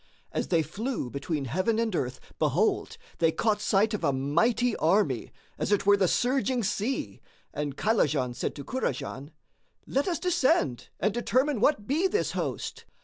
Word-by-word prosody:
As - - -2
they 165 -3 +2
flew 220 - -4
between 140 +1 -3
heaven 185 - 0
and 225 -4 0
earth, 130 -4 -2 0.2
behold, 180 - +1 0.2
they 165 -1 +4
caught 210 +3 0
sight 210 +3 +2
of 210 - -3
a - - +3
mighty 205 - +1
army, 160 - +1 0.3
as - - -1
it 205 - +2
were 205 0 +7
the 195 -2 +2
surging 255 +2 +1
sea, 210 +6 -2 0.3
and 145 -1 -3
Kaylajan 150 - +1
said 120 - -3
to 140 - -7
Kurajan, 145 - -3 0.6
"Let 275 +5 0
us 345 -3 0
descend 270 - +1
and 210 +2 +1
determine 255 +3 +1
what 220 -3 +2
be 315 - +2
this 420 +3 0
host." - - -4
205 Hz, 160 wpm, -28 LUFS, 150-245 Hz, 0.6 s, were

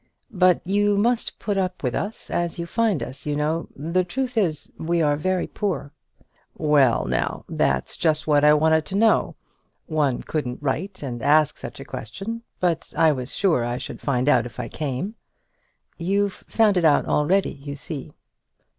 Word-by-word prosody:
"But 180 -2 +4
you 205 +2 +2
must 235 +3 +1
put 205 -2 -2
up 185 -3 -2
with 125 -2 0
us 210 +2 -4
as 175 0 -1
you 170 - -3
find 220 -3 0
us, 130 +3 -8
you 145 - 0
know. 155 +3 -1
The 170 +6 0
truth 250 +7 -3
is 175 -9 0
we 170 +1 0
are 150 -2 +3
very 185 +4 0
poor." 160 -9 -3 0.7
"Well, 145 -6 +3
now; - - -2
that's 65 -1 0
just 155 -2 +1
what 150 -2 +3
I 150 0 +7
wanted 160 +1 +3
to 190 - -4
know. 220 +2 +3 0.5
One 150 -5 0
couldn't 125 -6 -3
write 180 +6 -2
and 120 -4 -5
ask 150 +2 +3
such - - -8
a - - -8
question; 200 - -6 0.2
but 175 -3 0
I 160 - +5
was 130 -2 -4
sure 170 - +2
I 120 +1 -2
should - - -7
find 130 -2 0
out 125 -5 +4
if 120 - -12
I - - -4
came." 150 +7 -3 0.9
"You've 195 +3 -1
found 215 -4 +3
it 175 - +2
out 155 -3 +4
already, 185 +7 +2
you 140 +1 -8
see." 145 0 -6
160 Hz, 175 wpm, -23 LUFS, 145-190 Hz, 0.9 s, I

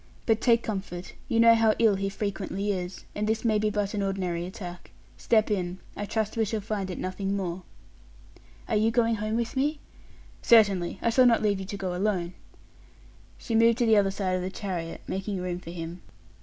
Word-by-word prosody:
But 225 -1 +2
take 235 -2 +4
comfort; 190 -4 -5
you 230 -4 +1
know 230 0 +8
how 225 -1 +4
ill 225 -3 +4
he 195 0 -1
frequently 200 0 -3
is, 180 -1 -5
and 210 0 -2
this 220 +2 -1
may 215 -2 +3
be 215 0 +1
but 205 -1 -1
an 205 - -1
ordinary 180 -3 -2
attack. 180 -1 -8 0.3
Step 220 -2 +2
in. 180 -3 -1 0.2
I 205 - -4
trust 220 -1 -1
we 225 - +3
shall 220 +1 -2
find 205 -2 -3
it 180 - -5
nothing 195 +1 -2
more." 180 -1 -3 1.1
"Are - - 0
you 215 +1 +3
going 230 -1 +2
home 215 +1 -2
with 235 +2 -2
me?" 290 +3 +1 0.6
"Certainly; 200 -6 +4
I 230 - +3
shall 255 +2 +6
not 230 -2 +3
leave 205 -2 +2
you 190 - -6
to 200 - -5
go 185 -2 -3
alone." 180 -2 -1 1.0
She 230 - -5
moved 230 0 +5
to 245 - +2
the 220 -2 +5
other 200 -1 +4
side 190 -1 -1
of 185 - -1
the 185 - -3
chariot, 180 -4 -5
making 195 0 -3
room 180 -1 -3
for 175 - -11
him. 170 +1 -6
200 Hz, 205 wpm, -27 LUFS, 185-220 Hz, 1.1 s, know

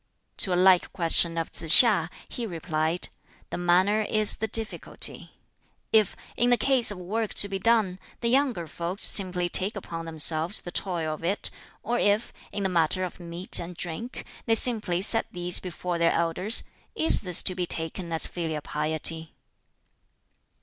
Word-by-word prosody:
To 190 - +2
a - - 0
like 185 0 +3
question 170 -1 -1
of 165 - -4
Tsz 165 -1 +12
hia, 205 -9 0 0.2
he 235 -2 -7
replied: 165 -1 -2 0.4
"The - - -5
manner 185 +4 +1
is 215 -1 +2
the 220 - -4
difficulty. 220 0 -2 0.6
If, 215 -3 +2 0.2
in 240 - 0
the 245 - +3
case 265 -3 0
of 205 - -4
work 210 +5 -5
to 200 - +6
be 195 -1 -6
done, 210 -4 0 0.2
the 235 - -3
younger 250 -8 -1
folks 170 +5 -2
simply 180 -3 +1
take 190 +4 +2
upon 165 -4 -8
themselves 160 +3 -2
the 175 - -10
toil 170 -4 -3
of 155 - -11
it; 190 +5 -2 0.3
or 240 +2 -3
if, 205 +2 -1 0.2
in 205 - -5
the - - 0
matter 180 +1 -1
of 185 - -8
meat 175 +1 +1
and 175 0 -9
drink, 180 +9 -7 0.2
they 225 - +2
simply 210 -7 +2
set 225 +2 +2
these 175 -1 -1
before 180 -1 -6
their 170 0 +1
elders 170 +6 -1 0.3
is 320 - +2
this 180 -4 0
to 185 - +2
be 180 -1 -5
taken 165 +2 -6
as 160 - +1
filial 160 -3 -6
piety?" 155 +2 -3
180 Hz, 170 wpm, -24 LUFS, 165-210 Hz, 0.6 s, Tsz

